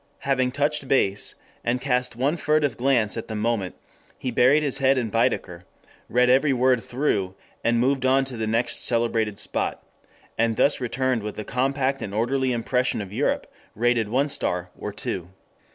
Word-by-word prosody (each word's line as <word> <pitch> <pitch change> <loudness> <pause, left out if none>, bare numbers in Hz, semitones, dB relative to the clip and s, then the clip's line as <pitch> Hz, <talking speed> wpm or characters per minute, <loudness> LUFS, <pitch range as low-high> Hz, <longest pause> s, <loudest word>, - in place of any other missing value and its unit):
Having 130 -2 +1
touched 145 0 0
base, 100 -7 +1 0.3
and 120 +2 0
cast 125 -2 -1
one 135 +6 +1
furtive 150 -5 +1
glance 120 -4 +1
at 115 - -5
the 110 - -5
monument, 105 -3 -1 0.4
he 130 - -3
buried 135 +6 +4
his 140 -1 -1
head 135 0 +3
in 115 -4 -1
Baedeker, 110 -7 0 0.5
read 125 +2 +3
every 135 +3 +4
word 125 -1 +2
through, 105 -8 -1 0.3
and 115 0 +2
moved 130 +2 +1
on 135 +1 +3
to 130 -2 -7
the 110 -1 -2
next 115 +2 0
celebrated 115 -3 0
spot; - - -3 0.6
and 115 -1 +2
thus 145 - +3
returned 130 -1 0
with 105 0 -6
a 110 - -5
compact 135 +2 0
and 100 -1 -5
orderly 130 +4 +1
impression 125 +1 0
of 100 -1 -6
Europe, - - 0 0.3
rated 115 -1 +1
one 135 +5 +2
star, 90 -10 -2
or 105 - -5
two. 95 -3 -4
125 Hz, 170 wpm, -24 LUFS, 110-135 Hz, 0.6 s, buried